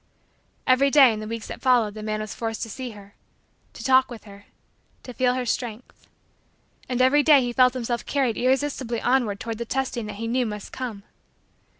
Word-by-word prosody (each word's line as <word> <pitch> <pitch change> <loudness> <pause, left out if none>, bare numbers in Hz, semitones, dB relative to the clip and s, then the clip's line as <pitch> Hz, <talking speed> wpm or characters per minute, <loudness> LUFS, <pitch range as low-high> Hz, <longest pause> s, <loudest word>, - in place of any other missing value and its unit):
Every 260 +2 +4
day, 270 -4 +6
in 215 - -5
the 215 - -6
weeks 230 -1 -5
that - - -8
followed, 245 -5 +3
the 215 - -8
man 215 0 -3
was 215 -1 -6
forced 225 -1 -4
to 225 - -6
see 255 +2 -6
her 200 0 -15 0.6
to - - -10
talk 260 -1 +4
with 240 -3 -10
her 200 -1 -14 0.6
to 250 - -9
feel 250 0 +1
her 255 -1 -2
strength. 235 0 -5 0.8
And 255 0 +1
every 280 +3 +5
day 290 -2 +6
he 245 -1 -2
felt 255 0 +4
himself 240 -1 -2
carried 265 -5 0
irresistibly 260 -2 0
onward 240 -6 +1
toward 225 -1 -5
the 235 - -3
testing 250 -3 -3
that 210 - -6
he 225 +3 -5
knew 245 +1 0
must 210 -1 -7
come. 235 -6 -6
240 Hz, 200 wpm, -24 LUFS, 220-260 Hz, 0.8 s, day